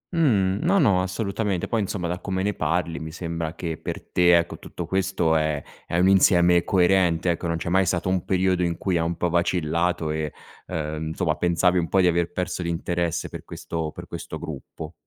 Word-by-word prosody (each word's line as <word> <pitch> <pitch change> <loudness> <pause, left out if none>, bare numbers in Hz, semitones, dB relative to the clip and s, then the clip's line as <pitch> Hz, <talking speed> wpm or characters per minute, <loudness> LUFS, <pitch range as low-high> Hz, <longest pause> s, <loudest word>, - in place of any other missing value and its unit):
Mh. 105 - +2
No, 190 +4 +3
no, 100 - +4
assolutamente, 100 0 -2
poi 115 -2 0
insomma, 95 -3 -2
da 90 +1 -3
come 95 -2 -2
ne 105 +1 0
parli 85 +1 -1
mi 80 0 -6
sembra 85 -1 -4
che 80 -3 -4
per - - -5
te 90 -1 +5
ecco, 85 - -2
tutto - - -7
questo 95 -4 +1
è 75 -2 +1 0.3
è 85 - -1
un 90 - +4
insieme 90 -2 +5
coerente 90 -3 +3
ecco, 85 0 -3
non 85 - -1
c'è 85 - -4
mai 95 0 +3
stato 90 +1 0
un 95 -2 0
periodo 95 -1 +1
in 85 -1 -1
cui 90 -2 0
ha - - +1
un 85 0 -2
po' 90 - 0
vacillato 85 -1 0
e, 75 -1 -2 0.4
uhm, 80 0 -3
insomma 80 -1 0
pensavi 90 +1 +2
un 85 - -2
po' 95 - +3
di 90 - +4
aver 85 -1 +1
perso 90 0 -3
l'interesse 85 0 -2
per - - -8
questo 80 -2 -5
per - - -9
questo - - -7
gruppo. 80 0 -8
85 Hz, 205 wpm, -24 LUFS, 85-95 Hz, 0.4 s, te